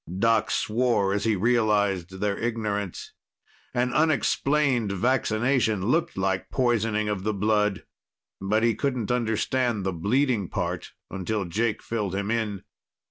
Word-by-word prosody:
Doc 110 +1 +2
swore 110 -4 +1
as 100 +1 -1
he 110 -1 +2
realized 100 -4 +1
their 105 -1 +1
ignorance. 105 -5 -3 0.6
An 125 0 0
unexplained 140 -6 +2
vaccination 110 -1 +1
looked 155 - 0
like 95 0 -1
poisoning 115 -4 +1
of 105 -3 -2
the 105 +2 -1
blood. 105 0 +1 0.6
But 105 +3 +1
he 115 -1 +3
couldn't 125 -5 -2
understand 120 -1 0
the 95 - -1
bleeding 110 - +1
part - - -3 0.2
until 100 +2 -2
Jake 110 +6 -1
filled 105 -5 -2
him 100 +2 -2
in. 105 -5 -2
110 Hz, 130 wpm, -26 LUFS, 100-120 Hz, 0.6 s, he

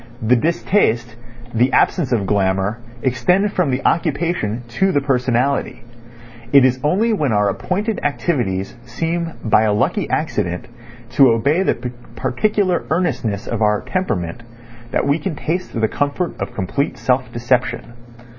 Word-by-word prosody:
The 120 +3 +4
distaste, 120 - +1 0.4
the 125 +3 +2
absence 160 -9 +2
of 110 -5 +1
glamour, 95 +2 0 0.2
extend 180 - +2
from 180 -6 +1
the 130 0 -2
occupation 155 -8 0 0.2
to 190 0 +4
the 145 - +2
personality. 130 -2 0 0.7
It 140 -2 +7
is 130 0 +2
only 205 +10 +2
when 150 - 0
our 105 -1 +2
appointed 205 - -2
activities 120 - -1
seem 165 +7 -3
by 110 -1 +4
a 110 -2 +2
lucky 105 - 0
accident 90 0 -1 0.5
to 135 +1 +6
obey 140 +10 +2
the 195 - +1 0.4
particular 190 +5 0
earnestness 135 - -1
of 115 -2 -3
our 105 -1 +2
temperament 115 - -2 0.5
that - - 0
we 140 +3 +2
can 160 +1 -3
taste 165 -4 -3
the 110 - +2
comfort 145 +9 -1
of 120 - -4
complete 130 +10 -2
self 125 -1 0
deception. 120 0 -1
130 Hz, 140 wpm, -19 LUFS, 115-170 Hz, 0.7 s, It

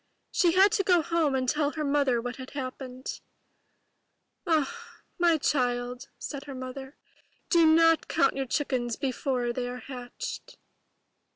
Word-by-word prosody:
She 345 -2 +3
had 385 +2 +6
to 425 -2 +1
go 355 -3 +4
home 320 -5 +1
and 260 -1 0
tell 295 +2 +1
her 310 - -3
Mother 280 -4 +2
what 245 +1 -5
had 260 0 -9
happened. 255 -1 -6 1.3
''Ah, 320 +5 +2 0.4
my 340 -2 +4
child,'* 250 -2 -1
said 280 -2 -6
the 275 - -6
Mother, 265 +2 -7 0.5
''do 335 -2 +6
not 330 0 +5
count - - +2
your 270 -1 -2
chickens 250 -4 -1
before 255 -2 -1
they 245 0 -3
are 250 0 -6
hatched." 250 -1 -7
270 Hz, 145 wpm, -28 LUFS, 250-315 Hz, 1.3 s, had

